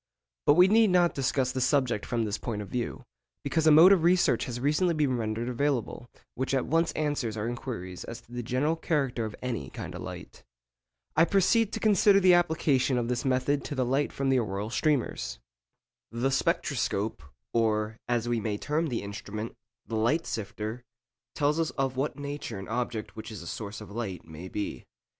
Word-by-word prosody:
But 145 - +7
we 180 +2 +7
need 220 +1 +5
not 175 -1 +4
discuss 130 -1 0
the 130 - -2
subject 130 -5 +1
from 115 -2 0
this 105 0 -3
point 105 -4 -3
of 100 - -11
view, 120 -2 -3 0.4
because 160 +3 +1
a - - +8
mode 165 +5 +9
of 195 -4 +5
research 175 +2 +3
has 120 -1 -5
recently 155 +6 +2
been 145 -4 +1
rendered 115 0 -2
available 125 -2 -1 0.2
which 130 +2 -1
at 130 - +1
once 165 +1 +2
answers 145 -8 -1
our 105 +2 -2
inquiries 115 -7 -5
as 115 - -7
to 120 - -23
the 120 0 -4
general 130 +7 0
character 140 -8 -1
of 110 - -6
any 115 - -3
kind - - -7
of - - -7
light. - - -9 0.7
I 160 - +6
proceed 200 +4 +3
to - - -2
consider 205 -1 +5
the 185 -2 +6
application 155 -7 +2
of 120 -1 -1
this 125 +2 -1
method 135 +2 +1
to 145 - -4
the 130 -1 +1
light 135 +4 +1
from 135 -1 -1
the 130 -1 +4
auroral 105 -1 -3
streamers. 130 - 0 0.7
The 120 +4 0
spectroscope, 135 - 0 0.3
or, 110 -1 +1
as 120 -1 0
we 120 -1 +1
may 105 -1 -2
term 155 +7 -1
the 120 -7 -3
instrument, 105 +2 -6 0.3
the 115 - -3
'light 145 +10 +1
sifter,' 110 +2 -4 0.5
tells 150 +1 +1
us 165 - +1
of 135 -1 0
what 135 +4 -2
nature 145 -6 -5
an 95 - -7
object 120 -1 -3
which 110 +1 -7
is 105 -5 -7
a - - -11
source 105 +3 -6
of 105 - -10
light 100 -6 -5
may 80 +3 -9
be. 105 +2 -4
125 Hz, 195 wpm, -28 LUFS, 110-150 Hz, 0.7 s, mode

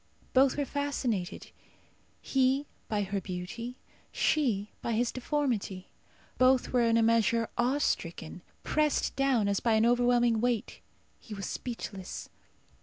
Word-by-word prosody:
Both 265 +1 +4
were 285 - 0
fascinated 260 -10 -2 0.7
he 265 +1 +2 0.2
by 210 -2 0
her 195 0 -2
beauty, 215 +8 -6 0.3
she 225 -10 +1
by 235 - -2
his 235 +2 +1
deformity. 245 -9 -2 0.5
Both 255 0 +4
were 250 - +4
in 230 -1 +3
a 230 - +4
measure 230 0 +3
awe 245 +4 +2
stricken. 170 - -2 0.2
Pressed 305 -1 +1
down, 265 -6 +2
as 200 -1 +1
by 230 - +2
an 220 +1 +4
overwhelming 240 -1 +3
weight, 245 -1 -1 0.4
he 215 - -9
was 195 -1 -5
speechless. 200 -6 -6
235 Hz, 130 wpm, -30 LUFS, 205-255 Hz, 0.7 s, Both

